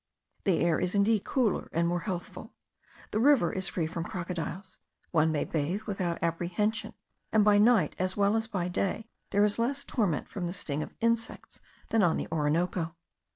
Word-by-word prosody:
The 190 Hz, -5 st, +3 dB
air 170 Hz, -2 st, +2 dB
is 180 Hz, +2 st, -1 dB
indeed 205 Hz, +1 st, +3 dB
cooler 245 Hz, -8 st, 0 dB
and 170 Hz, +1 st, +1 dB
more 175 Hz, +1 st, 0 dB
healthful. 180 Hz, -2 st, -6 dB, 0.6 s
The 215 Hz, -, 0 dB
river 255 Hz, -, +4 dB
is 190 Hz, 0 st, -1 dB
free 170 Hz, -, -1 dB
from 165 Hz, +1 st, -4 dB
crocodiles; 180 Hz, +2 st, -5 dB, 0.3 s
one 160 Hz, -1 st, +3 dB
may 150 Hz, -, 0 dB
bathe 165 Hz, +6 st, -1 dB
without 185 Hz, -6 st, -2 dB
apprehension, 175 Hz, +6 st, -1 dB, 0.4 s
and 215 Hz, -1 st, +4 dB
by 205 Hz, -1 st, +6 dB
night 215 Hz, -7 st, +4 dB
as 185 Hz, +1 st, -1 dB
well 205 Hz, +1 st, +3 dB
as 225 Hz, 0 st, 0 dB
by 190 Hz, -6 st, -2 dB
day 195 Hz, +4 st, -2 dB, 0.2 s
there 205 Hz, +1 st, +3 dB
is 210 Hz, +2 st, 0 dB
less 275 Hz, +4 st, 0 dB
torment 200 Hz, -, -1 dB
from 180 Hz, -4 st, -4 dB
the 175 Hz, -, -4 dB
sting 155 Hz, -6 st, -3 dB
of -, -, -7 dB
insects 230 Hz, 0 st, -1 dB, 0.3 s
than 225 Hz, -, +3 dB
on 175 Hz, -4 st, +3 dB
the -, -, -3 dB
Orinoco. 165 Hz, +2 st, 0 dB
185 Hz, 180 wpm, -29 LUFS, 170-215 Hz, 0.6 s, by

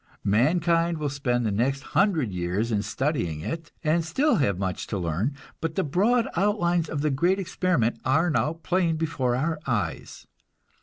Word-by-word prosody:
Mankind 165 Hz, -, +2 dB
will 150 Hz, -2 st, -2 dB
spend 125 Hz, -4 st, 0 dB
the 110 Hz, -, +1 dB
next 135 Hz, +6 st, 0 dB
hundred 165 Hz, -, +2 dB
years 90 Hz, +6 st, -1 dB
in 105 Hz, -2 st, +1 dB
studying 105 Hz, -, -2 dB
it, 165 Hz, -, -5 dB
and 160 Hz, +2 st, +2 dB
still 245 Hz, -, +2 dB
have 100 Hz, -, +1 dB
much 95 Hz, -1 st, -3 dB
to 105 Hz, -, -3 dB
learn, 90 Hz, -, -1 dB, 0.2 s
but 165 Hz, -1 st, -3 dB
the 190 Hz, -, +1 dB
broad 215 Hz, -, +2 dB
outlines 175 Hz, -4 st, +1 dB
of 145 Hz, -, -2 dB
the 150 Hz, 0 st, +1 dB
great 175 Hz, +8 st, +2 dB
experiment 180 Hz, -, 0 dB
are 155 Hz, +7 st, +2 dB
now 155 Hz, +1 st, +1 dB
plain 170 Hz, 0 st, 0 dB
before 145 Hz, -6 st, -1 dB
our 155 Hz, +4 st, -1 dB
eyes. 105 Hz, -10 st, -3 dB
150 Hz, 165 wpm, -26 LUFS, 115-170 Hz, 0.2 s, Mankind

